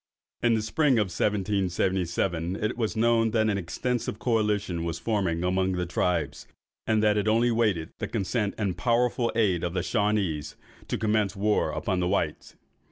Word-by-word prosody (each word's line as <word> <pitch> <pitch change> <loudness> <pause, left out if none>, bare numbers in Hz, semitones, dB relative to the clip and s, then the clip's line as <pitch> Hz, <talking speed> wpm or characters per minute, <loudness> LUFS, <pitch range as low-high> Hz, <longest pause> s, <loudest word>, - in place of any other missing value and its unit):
In 120 -1 +3
the 110 - -1
spring 145 +6 +2
of 105 -5 +2
1777, 95 -3 0
it 110 +3 -2
was 115 -2 -2
known 115 0 +3
that 110 -1 +2
an 100 - -1
extensive 115 +6 -2
coalition 105 -7 0
was 85 -1 -3
forming 95 -7 -1
among 95 +1 +1
the 90 0 -1
tribes, 85 -7 -1 0.4
and 110 -1 +2
that 105 -1 +3
it 105 0 0
only 115 +2 +3
waited 105 -8 0
the - - -2
consent 100 +1 -1
and 100 -5 -1
powerful 120 0 +1
aid 95 -7 +2
of 85 +1 -2
the 90 - 0
Shawanees, 100 -9 0 0.3
to - - -2
commence 105 -2 0
war 105 +2 +1
upon 95 -3 -2
the 90 - 0
whites. 85 -5 -2
105 Hz, 165 wpm, -27 LUFS, 90-110 Hz, 0.4 s, In